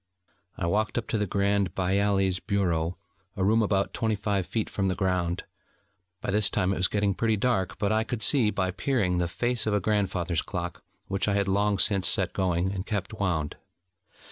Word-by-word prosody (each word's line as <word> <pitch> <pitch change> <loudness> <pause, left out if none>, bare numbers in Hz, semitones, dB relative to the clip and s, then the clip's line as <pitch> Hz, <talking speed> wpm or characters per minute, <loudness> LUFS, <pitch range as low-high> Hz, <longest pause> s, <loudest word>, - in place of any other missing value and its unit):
I 95 - -2
walked 105 +5 0
up 115 - -2
to 110 - 0
the 105 - 0
Grand 100 -1 0
Bailli's 95 0 +1
bureau, 90 -5 -1 0.4
a 95 - 0
room 110 +4 +3
about 100 -2 0
twenty 110 -2 0
five 100 -2 -1
feet 110 -2 -2
from 95 -1 -1
the 95 - 0
ground. 90 -2 -1 0.8
By - - -2
this 105 -1 +3
time 95 +1 0
it - - -3
was 95 - +3
getting 100 -1 0
pretty 110 +2 +1
dark, 100 -4 0
but 100 0 0
I 110 0 +2
could 120 -1 -2
see, 125 -7 +4
by 95 -3 -1
peering, 95 -6 0
the 90 - 0
face 120 +4 -1
of 105 - +2
a - - +2
grandfather's 95 -4 0
clock 90 -2 -5 0.2
which 95 +1 0
I 100 - +1
had 100 -1 +1
long 100 +1 +1
since 95 -2 +3
set - - +3
going, 90 0 0
and 95 -2 -4
kept 105 -1 -3
wound. 90 -8 -2
100 Hz, 195 wpm, -27 LUFS, 95-105 Hz, 0.8 s, see